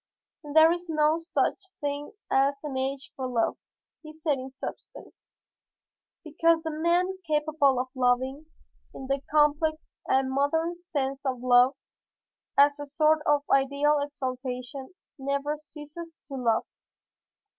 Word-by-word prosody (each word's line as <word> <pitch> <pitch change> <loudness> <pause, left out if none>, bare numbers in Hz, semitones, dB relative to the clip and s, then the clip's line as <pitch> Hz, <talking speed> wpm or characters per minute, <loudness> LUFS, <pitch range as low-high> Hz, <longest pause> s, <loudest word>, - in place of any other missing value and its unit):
"There 320 +1 +8
is 350 +1 -3
no 310 +1 +2
such 345 +4 0 0.2
thing 290 +5 -4 0.2
as 275 +1 +3
an 290 -3 -5
age 265 -1 -3
for 260 -2 -3
love," 235 -3 0 0.4
he 310 -1 -11
said 305 -3 0
in 260 +1 -7
substance, 265 - -9 1.1
"because 330 +1 +2
the 320 - -3
man 350 +4 +1
capable 300 -3 +2
of 255 +1 -2
loving 260 +3 0 0.5
in 265 - -7
the 275 +1 -1
complex 305 +1 +2 0.2
and 265 0 +2
modern 320 +5 0
sense 275 -6 -3
of 260 -3 -2
love 250 +2 +5 0.8
as 285 +1 +5
a 290 - -6
sort 305 +2 +3
of 290 -1 +3
ideal 280 +2 +3
exaltation 260 0 -5 0.2
never 280 +2 -2
ceases 305 +2 -10
to - - -8
love. 235 -4 +1
285 Hz, 130 wpm, -27 LUFS, 265-310 Hz, 1.1 s, There